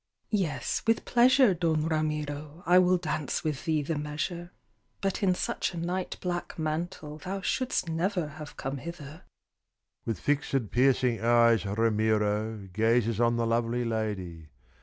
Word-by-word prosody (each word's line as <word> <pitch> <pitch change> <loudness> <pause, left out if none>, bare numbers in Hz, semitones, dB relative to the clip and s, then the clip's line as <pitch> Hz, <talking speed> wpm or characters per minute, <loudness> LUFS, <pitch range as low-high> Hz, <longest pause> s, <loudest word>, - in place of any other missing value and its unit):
"Yes, 160 - -1
with 225 0 +2
pleasure, 250 -2 +5
Don 160 -3 0
Ramiro, 150 0 -2
I 180 +2 +6
will 185 0 +4
dance 155 -4 -2
with 150 -3 -3
thee 155 -2 +1
the 150 +1 -2
measure; 155 +4 -4 0.5
But 195 +1 -1
in 185 -3 +3
such 180 - -2
a - - -5
night 180 +2 -3
black 175 -1 -3
mantle 155 -1 -3
Thou 190 +5 -4
shouldst 255 -1 -1
never 170 0 -1
have 150 0 -10
come 135 +1 -3
hither." 155 +1 -8 0.8
With 110 -6 -3
fixed, 135 -4 0
piercing 125 -2 +2
eyes, 115 -2 +4
Ramiro 110 -1 0
Gazes 115 +1 +2
on 120 0 +3
the 115 0 0
lovely 120 +1 0
lady. 100 -8 -3
150 Hz, 140 wpm, -28 LUFS, 115-175 Hz, 0.8 s, I